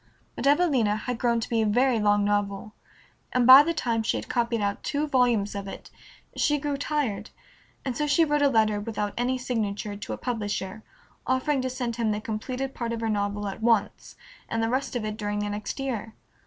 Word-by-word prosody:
But -, -, -1 dB
"Evelina" 280 Hz, -9 st, +3 dB
had 235 Hz, +2 st, -4 dB
grown 235 Hz, -1 st, +2 dB
to -, -, -3 dB
be 230 Hz, -1 st, +1 dB
a -, -, +2 dB
very 245 Hz, +2 st, +3 dB
long 205 Hz, -1 st, +3 dB
novel, 205 Hz, 0 st, -1 dB, 0.6 s
and 250 Hz, -1 st, +3 dB
by 260 Hz, +3 st, +11 dB
the 325 Hz, +3 st, 0 dB
time 235 Hz, -8 st, -1 dB
she 220 Hz, -, 0 dB
had -, -, -6 dB
copied 235 Hz, -1 st, 0 dB
out 200 Hz, -1 st, -1 dB
two 290 Hz, +1 st, -1 dB
volumes 245 Hz, -7 st, +2 dB
of 200 Hz, -1 st, -5 dB
it -, -, -9 dB, 0.4 s
she 295 Hz, -1 st, +2 dB
grew 290 Hz, 0 st, -2 dB
tired, 285 Hz, -6 st, -2 dB, 0.6 s
and 260 Hz, -3 st, -2 dB
so 300 Hz, +4 st, -1 dB
she 310 Hz, +3 st, +4 dB
wrote 295 Hz, -1 st, +1 dB
a 285 Hz, -, +5 dB
letter, 215 Hz, -4 st, +2 dB
without 210 Hz, -1 st, -3 dB
any 250 Hz, +2 st, 0 dB
signature, 210 Hz, -4 st, -3 dB
to 205 Hz, -, -6 dB
a -, -, -5 dB
publisher, 210 Hz, -4 st, -3 dB, 0.5 s
offering 260 Hz, +2 st, +1 dB
to 260 Hz, -, -2 dB
send 245 Hz, -2 st, -3 dB
him 230 Hz, -2 st, 0 dB
the 210 Hz, 0 st, 0 dB
completed 250 Hz, +5 st, -4 dB
part 235 Hz, -1 st, -3 dB
of 230 Hz, -, -4 dB
her 225 Hz, -, -1 dB
novel 205 Hz, -1 st, -1 dB
at 195 Hz, +3 st, -6 dB
once, 225 Hz, -3 st, 0 dB, 0.3 s
and 225 Hz, 0 st, -1 dB
the 225 Hz, -, +1 dB
rest 260 Hz, +1 st, -1 dB
of 230 Hz, -3 st, -2 dB
it 215 Hz, 0 st, -4 dB
during 205 Hz, -1 st, -2 dB
the 205 Hz, 0 st, -2 dB
next 205 Hz, +5 st, -5 dB
year. 230 Hz, -5 st, -4 dB
230 Hz, 210 wpm, -26 LUFS, 210-260 Hz, 0.6 s, by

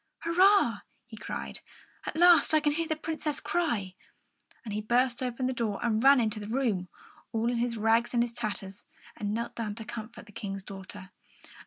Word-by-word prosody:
"Hurrah!" 345 Hz, -, +4 dB, 0.3 s
he 235 Hz, -2 st, -11 dB
cried. 210 Hz, -, -6 dB, 0.5 s
"At -, -, -4 dB
last 340 Hz, -2 st, +6 dB
I -, -, +6 dB
can 295 Hz, -1 st, +1 dB
hear 325 Hz, +2 st, -1 dB
the 315 Hz, -, 0 dB
Princess 310 Hz, -1 st, -2 dB
cry!" 235 Hz, -, -1 dB, 0.7 s
And 215 Hz, -, -5 dB
he 210 Hz, -, -2 dB
burst 240 Hz, +3 st, +1 dB
open 255 Hz, 0 st, -2 dB
the 260 Hz, -, 0 dB
door 225 Hz, -5 st, -2 dB
and 225 Hz, 0 st, +1 dB
ran 275 Hz, 0 st, +7 dB
into 215 Hz, -2 st, 0 dB
the 205 Hz, -, -7 dB
room, 220 Hz, -7 st, -1 dB, 0.4 s
all 230 Hz, +1 st, 0 dB
in 245 Hz, -, -1 dB
his 235 Hz, 0 st, -1 dB
rags 225 Hz, +3 st, +2 dB
and 235 Hz, -, +4 dB
his 240 Hz, -1 st, -4 dB
tatters, 205 Hz, -4 st, -5 dB, 0.3 s
and 205 Hz, -1 st, -3 dB
knelt 235 Hz, +2 st, -3 dB
down 215 Hz, -3 st, -4 dB
to 225 Hz, 0 st, -8 dB
comfort 230 Hz, 0 st, -8 dB
the 210 Hz, -, -15 dB
King's 195 Hz, -1 st, -6 dB
daughter. 195 Hz, 0 st, -9 dB
235 Hz, 190 wpm, -29 LUFS, 210-270 Hz, 0.7 s, ran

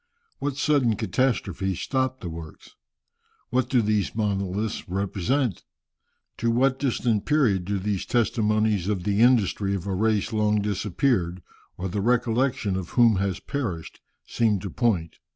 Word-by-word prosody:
What 140 Hz, -1 st, -2 dB
sudden 140 Hz, -6 st, +2 dB
catastrophe 95 Hz, -3 st, -1 dB
stopped 130 Hz, +4 st, -1 dB
the 90 Hz, -, -5 dB
works? 80 Hz, -1 st, -10 dB, 0.8 s
What 125 Hz, 0 st, +1 dB
do 125 Hz, -3 st, +3 dB
these 105 Hz, -1 st, 0 dB
monoliths 100 Hz, -1 st, -2 dB
represent? 100 Hz, -, -1 dB, 0.7 s
To 115 Hz, -, 0 dB
what 130 Hz, +3 st, +2 dB
distant 120 Hz, -5 st, 0 dB
period 125 Hz, -12 st, +2 dB
do 100 Hz, +1 st, -1 dB
these 95 Hz, 0 st, -2 dB
testimonies 110 Hz, -4 st, +1 dB
of 100 Hz, -4 st, -1 dB
the 100 Hz, +1 st, 0 dB
industry 105 Hz, -5 st, +3 dB
of 95 Hz, -1 st, -5 dB
a 100 Hz, -, -2 dB
race 110 Hz, +2 st, +1 dB
long 105 Hz, -1 st, +2 dB
disappeared, 100 Hz, -, 0 dB, 0.3 s
or 95 Hz, -, -3 dB
the 100 Hz, +2 st, -2 dB
recollection 120 Hz, -2 st, +1 dB
of 95 Hz, -2 st, -4 dB
whom 115 Hz, -4 st, +6 dB
has 95 Hz, -1 st, -1 dB
perished, 105 Hz, -, -5 dB, 0.2 s
seem 110 Hz, -3 st, +1 dB
to 95 Hz, -, -5 dB
point? 95 Hz, -9 st, 0 dB
105 Hz, 140 wpm, -25 LUFS, 95-120 Hz, 0.8 s, whom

